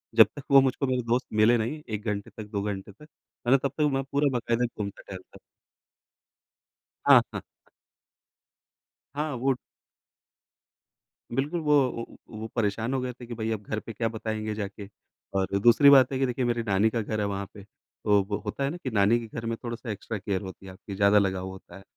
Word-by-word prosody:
जब 110 Hz, -3 st, +9 dB
तक 145 Hz, -, -8 dB
वो 135 Hz, 0 st, +9 dB
मुझको 135 Hz, +1 st, 0 dB
मेरे 130 Hz, -1 st, +1 dB
दोस्त 120 Hz, +2 st, 0 dB
मिले 110 Hz, +3 st, +5 dB
नहीं 120 Hz, +8 st, -3 dB
1 105 Hz, 0 st, -4 dB
घंटे 100 Hz, -2 st, -2 dB
तक 110 Hz, -, -5 dB
2 100 Hz, -2 st, -1 dB
घंटे 100 Hz, -1 st, -4 dB
तक, 100 Hz, -, -25 dB, 0.5 s
है -, -, +3 dB
ना? 135 Hz, -, +7 dB
तब 140 Hz, +1 st, -1 dB
तक 155 Hz, -, +2 dB
मैं 135 Hz, 0 st, 0 dB
पूरा 140 Hz, 0 st, +2 dB
बाकायदा 120 Hz, 0 st, 0 dB
घूमता-टहलता 100 Hz, -4 st, -8 dB
रहा। -, -, -21 dB, 1.7 s
हाँ, -, -, +9 dB
हाँ। -, -, -2 dB, 1.7 s
हाँ 150 Hz, +1 st, -2 dB
वो 130 Hz, +2 st, +1 dB, 1.8 s
बिल्कुल 150 Hz, +6 st, 0 dB
वो 150 Hz, -2 st, +2 dB, 0.2 s
वो 115 Hz, -, -5 dB, 0.3 s
वो 110 Hz, -, -4 dB
परेशान 110 Hz, +3 st, 0 dB
हो 130 Hz, -, 0 dB
गए 125 Hz, 0 st, -3 dB
थे 125 Hz, 0 st, -12 dB
कि 120 Hz, -, -6 dB
भई 110 Hz, 0 st, -3 dB
अब 105 Hz, -2 st, -3 dB
घर 110 Hz, +1 st, -3 dB
पे 115 Hz, -, -8 dB
क्या 115 Hz, +1 st, -1 dB
बताएँगे 110 Hz, -1 st, -4 dB
जाके 100 Hz, -1 st, -6 dB, 0.5 s
और 95 Hz, +1 st, 0 dB
दूसरी 120 Hz, +5 st, +7 dB
बात 135 Hz, -2 st, +7 dB
है 130 Hz, -, -1 dB
कि 135 Hz, -, +2 dB
देखिए 125 Hz, +1 st, -1 dB
मेरी 120 Hz, -1 st, 0 dB
नानी 105 Hz, 0 st, +2 dB
का 115 Hz, -, -1 dB
घर 110 Hz, +1 st, -3 dB
है 105 Hz, -, +1 dB
वहाँ 100 Hz, 0 st, -3 dB
पे। 100 Hz, -, -11 dB, 0.4 s
तो 105 Hz, -1 st, +5 dB
वो 105 Hz, -, -1 dB
होता 140 Hz, -, -2 dB
है 135 Hz, -, 0 dB
ना 165 Hz, -, -5 dB
कि 140 Hz, -7 st, -5 dB
नानी 110 Hz, +1 st, +4 dB
के 115 Hz, -, -7 dB
घर 115 Hz, -, -4 dB
में 115 Hz, 0 st, -1 dB
थोड़ा-सा 120 Hz, 0 st, -5 dB
एक्स्ट्रा 105 Hz, +1 st, -4 dB
केयर 100 Hz, -1 st, -2 dB
होती 95 Hz, 0 st, -9 dB
है 95 Hz, -, -8 dB
आपकी 100 Hz, +1 st, -9 dB
ज़्यादा 100 Hz, +1 st, +5 dB
लगाव 95 Hz, -2 st, 0 dB
होता 95 Hz, -1 st, -11 dB
है। 95 Hz, -, -12 dB
115 Hz, 210 wpm, -27 LUFS, 100-125 Hz, 1.8 s, जब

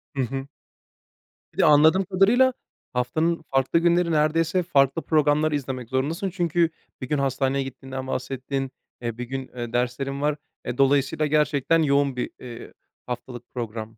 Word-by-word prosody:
Hı 135 Hz, -, 0 dB
hı. 135 Hz, +2 st, -4 dB, 1.1 s
Bir -, -, -24 dB
de -, -, +4 dB
anladığım 155 Hz, +6 st, +6 dB
kadarıyla, 215 Hz, +8 st, +4 dB, 0.4 s
haftanın 155 Hz, +7 st, 0 dB
farklı 135 Hz, +4 st, +2 dB
günleri 170 Hz, 0 st, +2 dB
neredeyse 165 Hz, +3 st, +2 dB
farklı 140 Hz, -2 st, +2 dB
programlar 155 Hz, 0 st, +2 dB
izlemek 130 Hz, -4 st, -3 dB
zorundasın. 150 Hz, +9 st, -1 dB
Çünkü 170 Hz, -2 st, +1 dB, 0.3 s
bir 130 Hz, -, -4 dB
gün 150 Hz, -, +1 dB
hastaneye 135 Hz, 0 st, 0 dB
gittiğinden 130 Hz, 0 st, -7 dB
bahsettin, 135 Hz, +1 st, -3 dB, 0.3 s
eee, 115 Hz, -2 st, -4 dB
bir 125 Hz, -, -4 dB
gün 130 Hz, +1 st, -5 dB, 0.3 s
derslerin 125 Hz, +3 st, -1 dB
var. 150 Hz, 0 st, +1 dB, 0.3 s
E, 120 Hz, 0 st, -4 dB
dolayısıyla 140 Hz, +2 st, +2 dB
gerçekten 150 Hz, +1 st, +2 dB
yoğun 140 Hz, -2 st, +2 dB
bir, 125 Hz, -, -2 dB
eee, 120 Hz, -2 st, -9 dB, 0.3 s
haftalık 125 Hz, 0 st, -6 dB
program. 115 Hz, -2 st, -5 dB
140 Hz, 140 wpm, -24 LUFS, 130-160 Hz, 1.1 s, anladığım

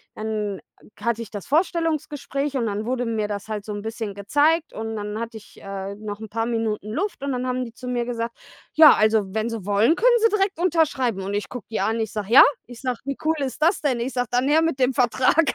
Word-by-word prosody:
dann 215 Hz, -3 st, -3 dB, 0.4 s
hatte 235 Hz, +2 st, -1 dB
ich 225 Hz, -, -7 dB
das 205 Hz, -3 st, -7 dB
Vorstellungsgespräch 300 Hz, -3 st, -1 dB
und 235 Hz, -, 0 dB
dann 210 Hz, +1 st, -3 dB
wurde 250 Hz, 0 st, -1 dB
mir 220 Hz, -2 st, -1 dB
das 205 Hz, -1 st, -5 dB
halt 215 Hz, -2 st, -4 dB
so 210 Hz, -, -5 dB
'n 205 Hz, -, -5 dB
bisschen 220 Hz, -2 st, -5 dB
gezeigt 290 Hz, -, +2 dB
und 225 Hz, 0 st, -4 dB
dann 210 Hz, 0 st, -4 dB
hatte 230 Hz, -1 st, -5 dB
ich, 215 Hz, -, -16 dB
äh, 195 Hz, 0 st, -5 dB
noch 210 Hz, 0 st, -7 dB
'n 220 Hz, -1 st, -8 dB
paar 225 Hz, +2 st, -2 dB
Minuten 225 Hz, -3 st, -2 dB
Luft 340 Hz, -, -3 dB
und 280 Hz, 0 st, -2 dB
dann 250 Hz, 0 st, -2 dB
haben 255 Hz, 0 st, -1 dB
die 230 Hz, -, -10 dB
zu 250 Hz, -, -9 dB
mir 245 Hz, -1 st, -1 dB
gesagt: 235 Hz, -1 st, -3 dB, 0.4 s
„Ja, 310 Hz, -1 st, +9 dB
also 215 Hz, 0 st, +3 dB
wenn 220 Hz, +1 st, 0 dB
Sie 225 Hz, -5 st, -5 dB
wollen, 205 Hz, +9 st, +3 dB
können 480 Hz, +4 st, +4 dB
Sie 455 Hz, 0 st, +4 dB
direkt 395 Hz, -2 st, 0 dB
unterschreiben.“, 295 Hz, -, +1 dB
und 195 Hz, +2 st, -3 dB
ich 205 Hz, -, -2 dB
gucke 245 Hz, -2 st, -8 dB
die 220 Hz, -, -2 dB
an 220 Hz, +3 st, 0 dB
und -, -, -1 dB
ich 220 Hz, -, -3 dB
sage: 210 Hz, -1 st, -4 dB
„Ja?“ 265 Hz, -, +11 dB, 0.2 s
ich 245 Hz, -1 st, -12 dB
sage: 255 Hz, -3 st, -2 dB
„Wie 275 Hz, -1 st, -3 dB
cool 320 Hz, +1 st, +3 dB
ist 275 Hz, +1 st, -4 dB
das 340 Hz, +5 st, +3 dB
denn?“, 265 Hz, -5 st, 0 dB
ich 245 Hz, +3 st, -3 dB
sage: 245 Hz, -2 st, -1 dB
„Dann 250 Hz, +2 st, +2 dB
her 310 Hz, +3 st, +4 dB
mit 325 Hz, -5 st, -1 dB
dem 255 Hz, 0 st, +3 dB
Vertrag.“ 255 Hz, +5 st, +3 dB
235 Hz, 245 wpm, -23 LUFS, 215-280 Hz, 0.4 s, Ja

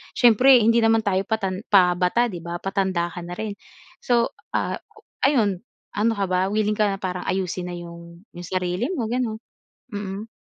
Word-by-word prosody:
siyempre 250 Hz, +2 st, +6 dB
hindi 230 Hz, +1 st, +4 dB
naman 225 Hz, 0 st, +3 dB
tayo 190 Hz, -2 st, +1 dB
patan 195 Hz, -3 st, -2 dB
pabata 180 Hz, +4 st, +4 dB
'di 175 Hz, -, -6 dB
ba, 170 Hz, +1 st, -5 dB
patanda 190 Hz, -3 st, -1 dB
ka 180 Hz, -, -7 dB
na 175 Hz, +1 st, -7 dB
rin. 210 Hz, +1 st, -4 dB, 0.4 s
So, 235 Hz, -1 st, +1 dB, 0.2 s
ah, -, -, -1 dB, 0.2 s
o -, -, -18 dB, 0.2 s
ayun, 220 Hz, -10 st, +3 dB, 0.4 s
ano 215 Hz, +3 st, +2 dB
ka 200 Hz, -1 st, 0 dB
ba, 180 Hz, 0 st, +1 dB
wiling 210 Hz, 0 st, +1 dB
ka 210 Hz, 0 st, +2 dB
na 195 Hz, -, -1 dB
parang 180 Hz, -1 st, -3 dB
ayusin 185 Hz, -1 st, -2 dB
na -, -, -5 dB
yung 170 Hz, 0 st, -11 dB
yung 175 Hz, -1 st, -8 dB
sarili 185 Hz, -, -1 dB
mo, 235 Hz, -8 st, -2 dB
gano'n? 240 Hz, -3 st, -1 dB, 0.5 s
Mm. 205 Hz, +1 st, -5 dB
195 Hz, 180 wpm, -23 LUFS, 180-220 Hz, 0.5 s, siyempre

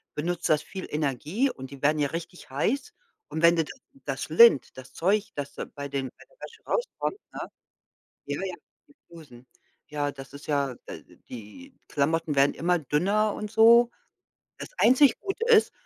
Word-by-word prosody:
benutzt 175 Hz, +3 st, -2 dB
das 155 Hz, -1 st, +3 dB
viel 190 Hz, -1 st, -8 dB
Energie 150 Hz, -, -1 dB
und 130 Hz, -, -10 dB
die 140 Hz, -, -11 dB
werden 150 Hz, +1 st, +2 dB
ja 145 Hz, -, +2 dB
richtig 170 Hz, 0 st, -7 dB
heiß. 215 Hz, -, -1 dB, 0.3 s
Und 160 Hz, -, -4 dB
wenn 170 Hz, +1 st, +7 dB
d 165 Hz, -, +3 dB
da -, -, -9 dB, 0.3 s
das 135 Hz, -2 st, -4 dB
lint 160 Hz, -, +6 dB
das 130 Hz, -1 st, -11 dB
Zeug, 200 Hz, +5 st, 0 dB
das 145 Hz, -1 st, -5 dB
da -, -, -5 dB
bei 140 Hz, -1 st, -8 dB
dem 135 Hz, -1 st, -2 dB
bei -, -, -16 dB
der -, -, -27 dB
Wäsche 460 Hz, -2 st, -11 dB
rauskommt, 485 Hz, -4 st, -2 dB
ne? -, -, -6 dB, 0.8 s
Ja, 145 Hz, +3 st, -4 dB
ja, 185 Hz, -2 st, -4 dB, 0.3 s
die 285 Hz, -, -22 dB
Flusen. 140 Hz, -8 st, -15 dB, 0.4 s
Ja, 145 Hz, -1 st, -2 dB
das 135 Hz, -2 st, -11 dB
ist 140 Hz, +1 st, -11 dB
ja, 140 Hz, -3 st, 0 dB
d -, -, -11 dB
die 125 Hz, -, -11 dB
Klamotten 160 Hz, +2 st, 0 dB
werden 140 Hz, +1 st, +4 dB
immer 175 Hz, +1 st, +1 dB
dünner 195 Hz, +9 st, +1 dB
und 210 Hz, -1 st, -6 dB
so. 235 Hz, +2 st, +6 dB, 0.7 s
Das -, -, -8 dB
einzig 260 Hz, +3 st, +5 dB
Gute 405 Hz, +2 st, -4 dB
ist, 455 Hz, -2 st, +5 dB
160 Hz, 180 wpm, -26 LUFS, 140-215 Hz, 0.8 s, wenn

